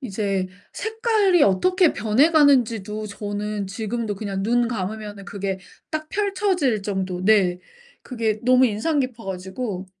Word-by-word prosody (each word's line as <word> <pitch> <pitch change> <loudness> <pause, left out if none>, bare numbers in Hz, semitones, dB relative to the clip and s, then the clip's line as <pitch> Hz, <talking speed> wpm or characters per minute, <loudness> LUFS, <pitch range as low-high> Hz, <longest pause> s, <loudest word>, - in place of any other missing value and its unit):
이제 195 -6 -2 0.3
색깔이 440 -6 +2
어떻게 360 - +3
변해 225 +9 +3
가는지도 230 - +3
저는 205 0 -4
지금도 220 +1 -3
그냥 195 -1 -4
눈 240 +2 +2
감으면은 210 -1 -5
그게 195 -1 -4 0.3
딱 310 0 -4
펼쳐질 380 - 0
정도 190 -2 -3
네. 190 -4 +4 0.4
그게 225 -4 -2
너무 255 +1 +5
인상 235 +9 0
깊어 250 -4 -4
가지고 190 +1 -5
215 Hz, 275 characters per minute, -23 LUFS, 200-275 Hz, 0.4 s, 너무